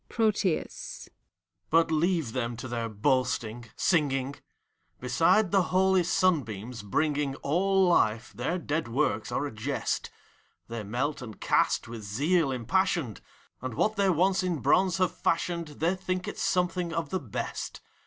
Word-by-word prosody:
PROTHUS. 210 -6 -1 0.6
But 165 0 +3
leave 160 -6 +1
them 120 -2 -2
to 120 - -6
their 115 -1 -3
boasting, 120 0 0
singing!. 140 -5 +1 0.6
Beside 165 - +3
the 195 -1 +5
holy 190 0 +3
simbeams, 125 - 0
bringing 145 +6 0
All 190 +5 +3
life, 115 -9 +2
their 175 - -2
dead 155 -4 -2
works 115 -4 0
are 145 - -1
a 145 - -4
jest. 125 +6 -2 0.6
They 115 -1 -5
melt 125 +9 -2
and 110 -4 -9
cast, - - +2
with 115 -1 -7
zeal 140 - +1
impassioned, 130 - 0 0.4
And 130 -3 -4
what 215 - +1
they 200 -1 +2
once 185 +3 +3
in 180 -3 -1
bronze 185 +5 +3
have 185 -2 +1
fashioned, 170 0 0
They 160 +4 0
think 185 -1 -3
it's - - -5
something 180 -1 0
of 165 -3 -3
the 185 - 0
best. 120 - -5
150 Hz, 145 wpm, -28 LUFS, 120-180 Hz, 0.6 s, the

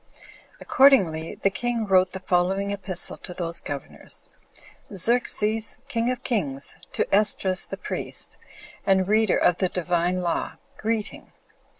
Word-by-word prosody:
Accordingly, 185 - +3
the 195 - 0
king 240 +1 -2
wrote 185 -2 +3
the 190 - -4
following 190 +2 0
epistle 190 -3 -2
to 180 - -10
those 170 -1 -1
governors: 145 -1 -7 0.6
"Xerxes, 220 +1 +1
king 235 -2 0
of 250 -1 -3
kings, 145 - -1 0.2
to - - +1
Esdras 195 -2 +4
the - - -6
priest, - - -3 0.4
and 190 -1 +2
reader 215 -1 +3
of 175 - +3
the 185 - 0
Divine 180 0 -1
law, 170 - -2 0.2
greeting. 220 -1 -3
190 Hz, 125 wpm, -24 LUFS, 180-220 Hz, 0.6 s, Esdras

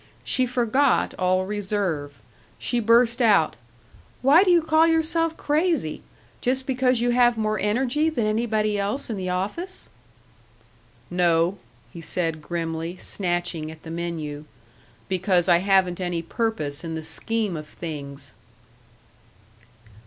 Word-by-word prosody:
She 255 -1 +1
forgot 250 +3 +2
all 185 0 +2
reserve. 190 - -2 0.4
She 240 - -1
burst 235 +2 +3
out: 205 -9 +4 0.7
"Why 295 +8 +7
do 390 - +1
you 350 -1 +6
call 315 +1 +4
yourself 325 0 +1
'crazy'? 300 - 0 0.4
Just 260 +1 0
because 255 -2 +1
you 245 0 +2
have 240 -1 +4
more 215 -1 0
energy 255 +9 +1
than 245 -9 -1
anybody 215 -1 0
else 210 +6 -2
in - - -2
the 185 -2 -4
office?" 205 - -3 1.2
"No," 175 +1 +2 0.3
he 170 - -8
said, 165 -1 -2
grimly, 165 +1 -4
snatching 175 -5 -2
at 160 0 -12
the 160 - -8
menu, 160 -3 -4 0.6
"because 185 -1 +1
I 175 -2 +6
haven't 190 -1 +2
any 175 -2 -2
purpose 165 -8 -2
in 165 -1 -4
the 160 - -5
scheme 220 +2 -2
of 155 -1 -7
things." 140 -5 -8
200 Hz, 130 wpm, -24 LUFS, 170-245 Hz, 1.2 s, Why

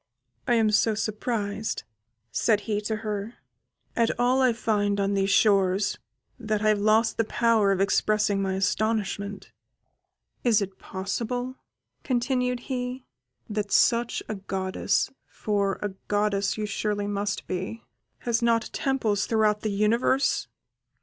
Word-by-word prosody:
"I 240 - +4
am 220 -2 +3
so 215 +1 +3
surprised," 215 0 -2 0.5
said 215 -3 +2
he 210 0 -2
to 220 +1 -2
her, 210 +2 -3 0.6
"at 230 -1 +3
all 250 +2 +3
I 255 -1 +5
find 205 -3 0
on 200 0 +1
these 195 0 +1
shores, 200 -1 +3 0.4
that 215 -2 -1
I 215 - +4
have 210 -1 +3
lost 220 +2 +3
the 225 - +3
power 225 -2 +2
of 195 - +1
expressing 205 +1 +2
my 190 -1 -1
astonishment. 200 0 -1 0.9
Is 235 -4 +4
it 195 -2 -5
possible," 245 +6 -3 0.5
continued 250 -1 0
he, 250 0 -4 0.4
"that 210 -2 -3
such 235 0 +3
a - - -3
goddess 190 -1 -1 0.2
(for 200 -2 -1
a 205 - 0 0.2
goddess 205 -1 +1
you 215 - -2
surely 205 0 -2
must 205 0 -2
be) 185 +5 -4 0.4
has 235 0 0
not 235 -1 +1
temples 225 -7 0
throughout 215 -2 +2
the 215 - -1
universe?" 225 +6 +2
215 Hz, 135 wpm, -26 LUFS, 200-230 Hz, 0.9 s, I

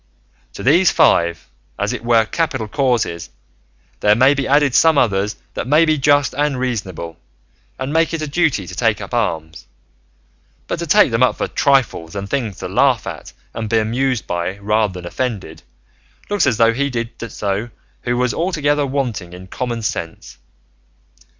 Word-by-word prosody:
To - - -8
these 170 +8 +5
five, 85 - +2 0.3
as - - -1
it - - -6
were 115 -1 +3
capital 135 -4 -2
causes, 115 - -1 0.7
there 105 0 +4
may 130 +5 +5
be 140 -1 -2
added 145 -1 +3
some 160 +1 +5
others 100 -4 +1 0.2
that - - -4
may 155 +4 +5
be 155 -2 +1
just 145 0 +3
and 145 -2 0
reasonable, 95 -10 -4 0.6
and 130 +2 -4
make 165 0 +2
it 165 -1 -3
a - - -3
duty 150 - 0
to - - -9
take - - +1
up - - -8
arms; 80 0 -2 1.0
but - - -4
to 170 - -4
take 205 - +5
them 115 +2 0
up 130 - +3
for - - -1
trifles 125 - +1
and 100 0 -4
things 115 -9 -2
to - - -5
laugh - - +2
at - - -7 0.2
and 110 -1 -4
be 115 - +2
amused 120 +3 0
by 90 +2 -3
rather 105 0 0
than 90 -1 -8
offended, 95 -6 -4 0.7
looks 205 -4 +2
as 110 - +1
though 115 0 +4
he 140 +4 0
who - - -2
did 115 -2 -5
so 100 +3 -2 0.3
was 120 0 0
altogether 150 -5 0
wanting 120 -10 -3
in 90 +1 -10
common 120 +3 -4
sense. 85 -5 -5
120 Hz, 170 wpm, -19 LUFS, 100-140 Hz, 1.0 s, these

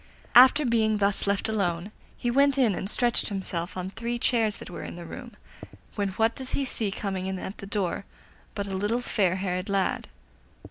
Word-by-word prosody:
After 260 +4 +8
being 220 -3 +2
thus 200 0 +1
left 200 0 +1
alone, 195 -3 -1 0.3
he 240 - -1
went 280 +2 +4
in 240 -6 +4
and 190 +2 -3
stretched 240 +1 +3
himself 185 -3 -4
on 185 +1 -4
three 235 +3 -3
chairs 225 -3 +1
that - - -10
were - - -6
in - - -7
the 170 0 -8
room, 240 +7 -9 0.6
when 200 -2 -1
what 225 +3 +2
does 260 -1 -4
he 275 - 0
see 225 -4 +1
coming 195 -2 -3
in 190 0 -2
at 190 +2 -7
the 195 - -8
door 200 -2 -2 0.5
but 200 - -2
a 195 - -5
little 210 +5 0
fair 190 -7 +1
haired 185 0 -2
lad. 195 -1 0
205 Hz, 195 wpm, -27 LUFS, 190-235 Hz, 0.6 s, After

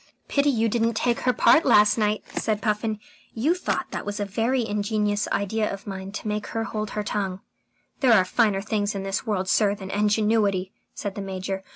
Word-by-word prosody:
"Pity 285 0 +2
you 230 -4 +2
didn't 230 0 +1
take 240 +1 +1
her 250 - +2
part 320 +7 +5
last 210 0 +5
night," 210 -1 0
said 215 -2 0
Puffin. 215 -1 -1 0.4
"You 270 +9 +2
thought 365 - -3
that - - -4
was 205 0 -4
a 205 - -1
very 230 +4 0
ingenious 210 0 0
idea 215 +2 -1
of 195 0 -7
mine 190 -1 -6
to 215 - -5
make 210 0 -2
her 225 - 0
hold 215 0 -4
her 210 - 0
tongue." 195 -2 -3 0.6
"There 255 -5 +5
are 190 -4 +5
finer 200 -1 +1
things 210 -1 -1
in 195 - -3
this 195 +2 -3
world, 190 -3 -1
sir, 205 +1 +3
than 190 -1 -8
ingenuity," 210 -2 +1 0.2
said 200 - -4
the 200 - -6
Major. 190 0 -4
210 Hz, 200 wpm, -25 LUFS, 200-225 Hz, 0.6 s, part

